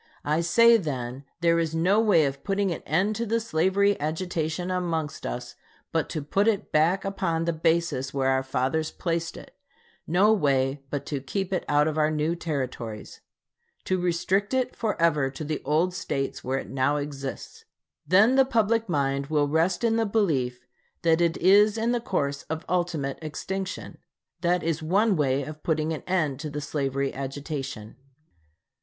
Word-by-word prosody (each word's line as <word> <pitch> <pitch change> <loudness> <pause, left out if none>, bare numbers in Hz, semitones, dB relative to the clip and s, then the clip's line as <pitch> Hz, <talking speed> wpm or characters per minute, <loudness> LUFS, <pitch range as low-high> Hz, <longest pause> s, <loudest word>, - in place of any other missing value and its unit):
I 155 +3 +1
say 230 +7 +6
then 135 - -4 0.2
there 170 0 +3
is 165 -1 -1
no 185 +6 +3
way 200 -9 +4
of 140 0 -4
putting 195 -1 0
an 170 - -4
end 190 +8 +1
to 235 - -1
the 230 +2 +1
slavery 200 0 +1
agitation 165 +2 -2
amongst 165 -4 -2
us, 120 0 -5 0.4
but 165 -1 0
to 155 -4 -3
put 195 +8 +1
it 210 -2 0
back 170 +6 +2
upon 170 -4 -1
the 170 - 0
basis 160 -5 0
where 135 -1 0
our 130 0 +2
fathers 135 +4 -1
placed 165 -1 -3
it, - - -13 0.5
no 195 +6 +4
way 135 -6 +1
but 140 0 -3
to 140 -3 -3
keep 190 +7 -3
it 185 - 0
out 150 +1 +4
of 155 0 -1
our 155 0 +3
new 155 +2 0
Territories 130 -9 -5 0.6
to 185 -1 0
restrict 185 +6 0
it 255 -1 0
forever 165 - +1
to 135 +3 -7
the 155 0 -3
old 160 +6 +1
States 135 -6 -3
where 130 +1 -1
it - - -6
now 135 +2 +1
exists. 140 -2 -6 0.4
Then 200 - +5
the 270 0 +6
public 230 -4 +1
mind 140 -3 0
will 150 -1 +1
rest 165 +7 +1
in 225 -1 +2
the 225 - +2
belief 135 - 0 0.4
that 165 0 +3
it 170 -1 +2
is 205 +4 +5
in 230 +2 +1
the 240 -1 0
course 140 -10 -1
of 160 0 -4
ultimate 170 -6 -1
extinction. 190 +5 -5 0.4
That 175 0 +1
is 165 0 -1
one 195 +6 +2
way 140 -3 +1
of 155 +2 -8
putting 160 -1 0
an 155 - -5
end 155 -8 0
to 155 - -4
the 150 0 -4
slavery 140 -2 -2
agitation. 135 -4 -5
160 Hz, 175 wpm, -26 LUFS, 140-190 Hz, 0.6 s, say